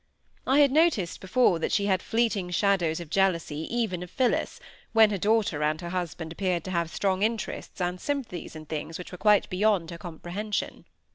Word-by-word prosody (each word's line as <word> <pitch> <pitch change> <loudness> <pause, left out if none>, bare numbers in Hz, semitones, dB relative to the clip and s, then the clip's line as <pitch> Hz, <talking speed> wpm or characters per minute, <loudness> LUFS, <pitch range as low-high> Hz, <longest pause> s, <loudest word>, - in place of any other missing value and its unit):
I 275 +3 +5
had 280 -2 +5
noticed 295 - +2
before 190 -2 +3
that - - -1
she 200 - +2
had 190 -3 +2
fleeting 220 -5 0
shadows 180 -3 +1
of 170 -3 -9
jealousy 170 -5 0
even 225 -7 -1
of 180 - -7
Phillis, 250 +6 0 0.3
when 220 -1 +6
her 200 - 0
daughter 210 -6 +1
and 155 +1 +1
her 170 -1 -6
husband 170 -2 -4
appeared 180 -1 -1
to 185 - -6
have 170 -2 0
strong 190 +1 0
interests 220 -1 -2
and 180 0 -2
sympathies 260 - -4
in 155 0 -8
things 155 +1 -5
which 180 - -9
were 180 - -9
quite 210 -2 +4
beyond 185 -3 +1
her 170 - -8
comprehension. 180 +5 -4
185 Hz, 190 wpm, -27 LUFS, 170-215 Hz, 0.3 s, when